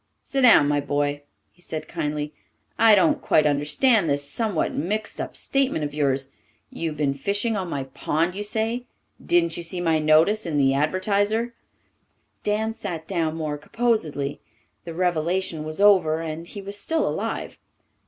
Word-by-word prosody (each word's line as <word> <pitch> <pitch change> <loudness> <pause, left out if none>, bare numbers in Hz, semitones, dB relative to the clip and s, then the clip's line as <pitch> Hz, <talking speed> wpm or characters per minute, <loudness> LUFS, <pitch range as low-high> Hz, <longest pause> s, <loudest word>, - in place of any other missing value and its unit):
"Sit 275 - -1
down, 230 - +7
my 145 0 +2
boy," 145 0 -1 0.3
he 175 - -26
said 155 -2 -6
kindly. 150 0 -3 0.5
"I 225 -1 +7
don't 300 +5 +3
quite 155 - +3
understand 155 - +2
this 140 0 0
somewhat 210 +1 -1
mixed 210 +7 -2
up - - -6
statement 270 - 0
of 145 -1 -3
yours. 135 -2 0 0.4
You've 160 -2 -4
been 140 -2 +1
fishing 205 - -1
on 190 -3 -3
my 140 -4 -2
pond, 155 +6 -1
you 205 +2 -4
say. 225 +3 -2 0.4
Didn't 170 -1 +2
you - - -4
see 175 +2 -4
my 165 -2 +2
notice 160 +7 +3
in 155 -3 -1
the 135 -1 +3
Advertiser?" 205 - 0 0.9
Dan 220 +2 0
sat 170 -7 -6
down 165 -4 -1
more 155 -2 -3
composedly. 155 -11 -1 0.5
The 165 -1 -7
revelation 175 -1 0
was 155 +2 -5
over 185 -6 +5
and 165 +1 -5
he 200 +2 -8
was 200 +1 -6
still 320 +9 0
alive. - - -3
170 Hz, 160 wpm, -24 LUFS, 150-210 Hz, 0.9 s, down